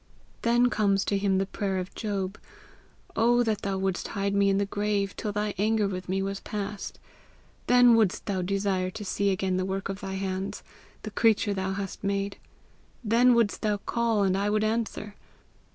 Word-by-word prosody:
Then 240 Hz, +1 st, +3 dB
comes 200 Hz, -2 st, +2 dB
to 200 Hz, -, +1 dB
him 195 Hz, -1 st, +2 dB
the 195 Hz, -, +1 dB
prayer 195 Hz, 0 st, -2 dB
of 185 Hz, 0 st, -4 dB
Job, 200 Hz, -2 st, -3 dB, 0.8 s
'Oh 240 Hz, +2 st, +4 dB
that 220 Hz, -3 st, -1 dB
thou 195 Hz, -1 st, -2 dB
wouldst 190 Hz, -1 st, -1 dB
hide 200 Hz, 0 st, -2 dB
me 200 Hz, 0 st, +3 dB
in 195 Hz, -, +2 dB
the 200 Hz, -, +1 dB
grave 205 Hz, -1 st, -1 dB
till 215 Hz, -, -3 dB
thy 210 Hz, 0 st, -1 dB
anger 215 Hz, 0 st, +2 dB
with 185 Hz, -2 st, -5 dB
me 190 Hz, +1 st, 0 dB
was 195 Hz, 0 st, -3 dB
past! 205 Hz, -1 st, -5 dB, 0.7 s
Then 245 Hz, -1 st, +7 dB
wouldst 220 Hz, -5 st, +2 dB
thou 190 Hz, -3 st, -1 dB
desire 195 Hz, 0 st, 0 dB
to 210 Hz, +3 st, -7 dB
see 200 Hz, +1 st, 0 dB
again 190 Hz, -1 st, 0 dB
the 185 Hz, -, 0 dB
work 190 Hz, +1 st, -3 dB
of 195 Hz, 0 st, -4 dB
thy 190 Hz, 0 st, -4 dB
hands, 190 Hz, 0 st, -3 dB, 0.4 s
the -, -, -5 dB
creature 220 Hz, -2 st, +3 dB
thou 190 Hz, 0 st, -2 dB
hadst 195 Hz, 0 st, -5 dB
made! 200 Hz, 0 st, -1 dB, 0.7 s
Then 240 Hz, +3 st, +5 dB
wouldst 230 Hz, -3 st, +1 dB
thou 210 Hz, -2 st, +1 dB
call, 225 Hz, 0 st, 0 dB
and 190 Hz, -1 st, +2 dB
I 200 Hz, +1 st, 0 dB
would 215 Hz, 0 st, +1 dB
answer.' 215 Hz, -1 st, -2 dB
200 Hz, 185 wpm, -27 LUFS, 195-215 Hz, 0.8 s, Then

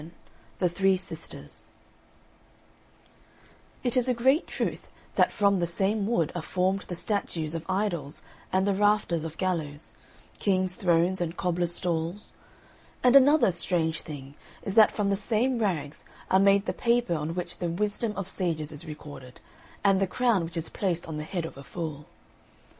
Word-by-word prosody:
XI 165 Hz, -, -11 dB, 0.5 s
THE 180 Hz, -, +2 dB
THREE 190 Hz, +2 st, +2 dB
SISTERS 190 Hz, -, -6 dB, 2.2 s
It 245 Hz, -1 st, +2 dB
is 255 Hz, 0 st, +3 dB
a 250 Hz, -, +2 dB
great 265 Hz, +7 st, +3 dB
truth -, -, -3 dB, 0.3 s
that -, -, +3 dB
from 200 Hz, -2 st, +3 dB
the 170 Hz, -, +1 dB
same 195 Hz, +4 st, 0 dB
wood 175 Hz, -10 st, +1 dB
are 175 Hz, -, -3 dB
formed 185 Hz, +3 st, 0 dB
the 175 Hz, -, -4 dB
statues 170 Hz, -5 st, -2 dB
of 165 Hz, -1 st, -3 dB
idols 185 Hz, -7 st, -2 dB, 0.3 s
and 190 Hz, +1 st, +2 dB
the 200 Hz, -, +2 dB
rafters 205 Hz, -5 st, +2 dB
of 165 Hz, 0 st, -6 dB
gallows, 160 Hz, -5 st, -2 dB, 0.5 s
kings' 185 Hz, -2 st, +1 dB
thrones 175 Hz, 0 st, +2 dB
and 170 Hz, 0 st, -2 dB
cobblers' 175 Hz, -1 st, 0 dB
stalls; 170 Hz, +3 st, -3 dB, 0.7 s
and 250 Hz, +1 st, +6 dB
another 275 Hz, -4 st, +7 dB
strange 165 Hz, -2 st, 0 dB
thing 140 Hz, -3 st, -8 dB, 0.3 s
is 195 Hz, -, -2 dB
that 220 Hz, 0 st, +7 dB
from 200 Hz, -2 st, 0 dB
the -, -, +3 dB
same 230 Hz, +5 st, +1 dB
rags 165 Hz, -9 st, -2 dB, 0.3 s
are 190 Hz, -, +6 dB
made 200 Hz, +1 st, +4 dB
the -, -, -1 dB
paper 235 Hz, -5 st, +1 dB
on 160 Hz, +1 st, -2 dB
which 175 Hz, -1 st, -4 dB
the 175 Hz, -, -1 dB
wisdom 210 Hz, +5 st, -1 dB
of 195 Hz, -2 st, -3 dB
sages 165 Hz, -6 st, -2 dB
is 155 Hz, +2 st, -8 dB
recorded, 145 Hz, -4 st, -10 dB, 0.4 s
and 195 Hz, -1 st, +4 dB
the 195 Hz, -, +2 dB
crown 230 Hz, -2 st, +2 dB
which 165 Hz, +1 st, -6 dB
is 165 Hz, -, -2 dB
placed 175 Hz, -4 st, -2 dB
on 160 Hz, -2 st, -5 dB
the 150 Hz, -, -3 dB
head 170 Hz, +1 st, -3 dB
of 160 Hz, -, -8 dB
a 140 Hz, -, -9 dB
fool. 155 Hz, -2 st, -6 dB
180 Hz, 170 wpm, -27 LUFS, 165-205 Hz, 2.2 s, another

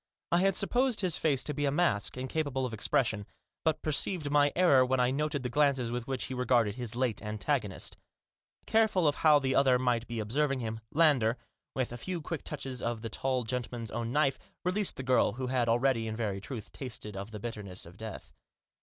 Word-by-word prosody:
I 170 Hz, -, +4 dB
had 195 Hz, 0 st, +3 dB
supposed 245 Hz, +4 st, +2 dB
his 180 Hz, -5 st, +1 dB
face 140 Hz, -5 st, +1 dB
to 150 Hz, -, -1 dB
be 145 Hz, +1 st, -1 dB
a 140 Hz, -, +2 dB
mask, 145 Hz, -9 st, +1 dB
incapable 130 Hz, 0 st, -1 dB
of 120 Hz, -, -4 dB
expression, 110 Hz, -1 st, 0 dB, 0.4 s
but 160 Hz, -1 st, 0 dB
perceived 155 Hz, 0 st, 0 dB
my 145 Hz, -1 st, +4 dB
error 170 Hz, -8 st, +6 dB
when 130 Hz, 0 st, +1 dB
I 125 Hz, 0 st, +3 dB
noted 145 Hz, 0 st, -1 dB
the 125 Hz, -, -2 dB
glances 135 Hz, -3 st, +2 dB
with 120 Hz, 0 st, -3 dB
which 130 Hz, -2 st, -2 dB
he 130 Hz, -, -5 dB
regarded 125 Hz, -4 st, +2 dB
his 120 Hz, -1 st, -4 dB
late 125 Hz, -3 st, 0 dB
antagonist 105 Hz, 0 st, -2 dB, 0.7 s
Careless 220 Hz, -1 st, +3 dB
of 155 Hz, -6 st, +3 dB
how 155 Hz, -2 st, +6 dB
the 135 Hz, -2 st, 0 dB
other 130 Hz, -2 st, +5 dB
might 120 Hz, -2 st, 0 dB
be 120 Hz, -1 st, -4 dB
observing 135 Hz, +6 st, 0 dB
him, 110 Hz, -2 st, -4 dB
Lander, 140 Hz, -7 st, +3 dB, 0.4 s
with 130 Hz, -3 st, -1 dB
a -, -, -5 dB
few 180 Hz, +8 st, -4 dB
quick 160 Hz, -1 st, -5 dB
touches 130 Hz, -2 st, -6 dB
of 120 Hz, -1 st, -2 dB
the 115 Hz, -, -4 dB
tall 130 Hz, +2 st, 0 dB
gentle 120 Hz, +1 st, -3 dB
man's 115 Hz, -2 st, -5 dB
own 115 Hz, 0 st, -3 dB
knife, 140 Hz, -1 st, +2 dB, 0.3 s
released 195 Hz, +2 st, +1 dB
the 130 Hz, -, -5 dB
girl 130 Hz, 0 st, +3 dB
who 130 Hz, +1 st, -4 dB
had 125 Hz, -2 st, +1 dB
already, 120 Hz, -1 st, +2 dB
in 110 Hz, -, -3 dB
very 105 Hz, -4 st, -2 dB
truth, 110 Hz, -1 st, -7 dB
tasted 110 Hz, -5 st, -7 dB
of 100 Hz, +2 st, -5 dB
the 110 Hz, -1 st, -7 dB
bitterness 100 Hz, -4 st, -6 dB
of 85 Hz, +1 st, -13 dB
death. 110 Hz, +2 st, -8 dB
130 Hz, 205 wpm, -30 LUFS, 115-145 Hz, 0.7 s, error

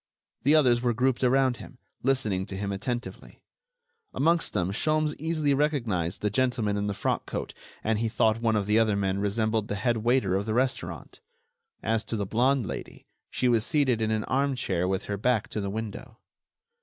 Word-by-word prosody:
The 145 Hz, +4 st, +4 dB
others 125 Hz, -6 st, +4 dB
were 120 Hz, -2 st, +1 dB
grouped 130 Hz, +1 st, +1 dB
around 130 Hz, -1 st, +3 dB
him, -, -, -12 dB, 0.2 s
listening 110 Hz, -8 st, 0 dB
to 95 Hz, -, -6 dB
him 100 Hz, 0 st, -3 dB
attentively. 120 Hz, +5 st, -5 dB, 0.7 s
Amongst 165 Hz, +3 st, +2 dB
them 90 Hz, +1 st, -1 dB
Sholmes 155 Hz, +7 st, +1 dB
easily 155 Hz, -2 st, +1 dB
recognized 120 Hz, -, 0 dB
the 105 Hz, -, +1 dB
gentleman 120 Hz, -3 st, +1 dB
in 100 Hz, 0 st, -1 dB
the 100 Hz, -, -2 dB
frock -, -, -1 dB
coat -, -, -4 dB, 0.3 s
and 110 Hz, 0 st, +1 dB
he 115 Hz, 0 st, 0 dB
thought 110 Hz, 0 st, +2 dB
one 115 Hz, -2 st, +2 dB
of 105 Hz, -2 st, +1 dB
the 105 Hz, +2 st, +3 dB
other 110 Hz, -2 st, +2 dB
men 100 Hz, -1 st, 0 dB
resembled 110 Hz, +1 st, 0 dB
the 105 Hz, -, -2 dB
head 120 Hz, +3 st, 0 dB
waiter 115 Hz, -3 st, +2 dB
of 100 Hz, +2 st, -1 dB
the 110 Hz, -, -1 dB
restaurant. 130 Hz, +1 st, -2 dB, 0.6 s
As 115 Hz, 0 st, 0 dB
to 115 Hz, -, -4 dB
the 105 Hz, -2 st, -1 dB
blonde 125 Hz, +4 st, +2 dB
Lady, -, -, -7 dB, 0.2 s
she 125 Hz, -, 0 dB
was 115 Hz, -3 st, +3 dB
seated 130 Hz, -5 st, +1 dB
in 110 Hz, -, +1 dB
an 110 Hz, -1 st, 0 dB
armchair 130 Hz, -10 st, 0 dB
with 95 Hz, 0 st, -1 dB
her 100 Hz, -, -3 dB
back 115 Hz, +1 st, +1 dB
to 105 Hz, -, -3 dB
the 100 Hz, -, -3 dB
window. 110 Hz, +3 st, -6 dB
115 Hz, 190 wpm, -27 LUFS, 105-130 Hz, 0.7 s, The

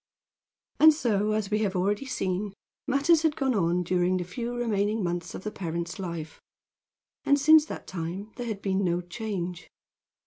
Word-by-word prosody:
And 315 Hz, 0 st, +8 dB
so, 215 Hz, -6 st, +1 dB
as 215 Hz, -1 st, -2 dB
we 210 Hz, -, +2 dB
have 205 Hz, -3 st, 0 dB
already 205 Hz, +8 st, 0 dB
seen, 195 Hz, -3 st, -2 dB, 0.3 s
matters 285 Hz, +5 st, +4 dB
had 320 Hz, -2 st, +1 dB
gone 265 Hz, -2 st, +1 dB
on 180 Hz, -3 st, +1 dB
during 180 Hz, +1 st, +1 dB
the 180 Hz, -, -2 dB
few 235 Hz, +7 st, -5 dB
remaining 215 Hz, -3 st, 0 dB
months 175 Hz, 0 st, -3 dB
of -, -, -7 dB
the 215 Hz, -, -3 dB
parent's 170 Hz, -1 st, -4 dB
life. 170 Hz, -4 st, -6 dB, 0.8 s
And 285 Hz, 0 st, +3 dB
since 310 Hz, +2 st, +6 dB
that -, -, -7 dB
time 185 Hz, +4 st, -5 dB
there 245 Hz, -1 st, -5 dB
had 210 Hz, -3 st, -4 dB
been 195 Hz, 0 st, +1 dB
no 175 Hz, -1 st, +1 dB
change. 180 Hz, -3 st, -5 dB
200 Hz, 170 wpm, -27 LUFS, 180-235 Hz, 0.8 s, And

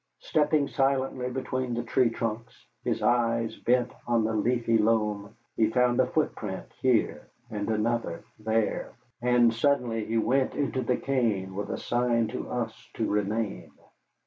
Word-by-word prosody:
Stepping 150 Hz, -1 st, +2 dB
silently 135 Hz, -2 st, 0 dB
between 130 Hz, -1 st, -2 dB
the 120 Hz, -, -2 dB
tree 120 Hz, +1 st, +2 dB
trunks, 115 Hz, 0 st, -5 dB, 0.2 s
his -, -, -1 dB
eyes 115 Hz, -1 st, +2 dB
bent 125 Hz, 0 st, +1 dB, 0.2 s
on 120 Hz, -2 st, +2 dB
the 110 Hz, +1 st, 0 dB
leafy 115 Hz, +1 st, +2 dB
loam, 105 Hz, -2 st, +1 dB, 0.2 s
he 110 Hz, -1 st, +3 dB
found 125 Hz, +1 st, +2 dB
a 130 Hz, -, +4 dB
footprint 110 Hz, -9 st, -2 dB, 0.2 s
here 125 Hz, -4 st, +1 dB, 0.2 s
and 105 Hz, 0 st, -3 dB
another 110 Hz, -4 st, -1 dB, 0.2 s
there, 110 Hz, 0 st, -1 dB, 0.3 s
and 120 Hz, -1 st, +4 dB
suddenly 120 Hz, -3 st, +1 dB
he 115 Hz, +1 st, -1 dB
went 130 Hz, +4 st, +1 dB
into 140 Hz, -2 st, -1 dB
the 125 Hz, 0 st, 0 dB
cane 110 Hz, -8 st, 0 dB
with 100 Hz, +2 st, -4 dB
a -, -, -2 dB
sign 120 Hz, -1 st, +1 dB
to 125 Hz, -, -5 dB
us 115 Hz, -1 st, -4 dB
to 110 Hz, -, 0 dB
remain. 105 Hz, +1 st, -1 dB
115 Hz, 145 wpm, -28 LUFS, 110-125 Hz, 0.3 s, a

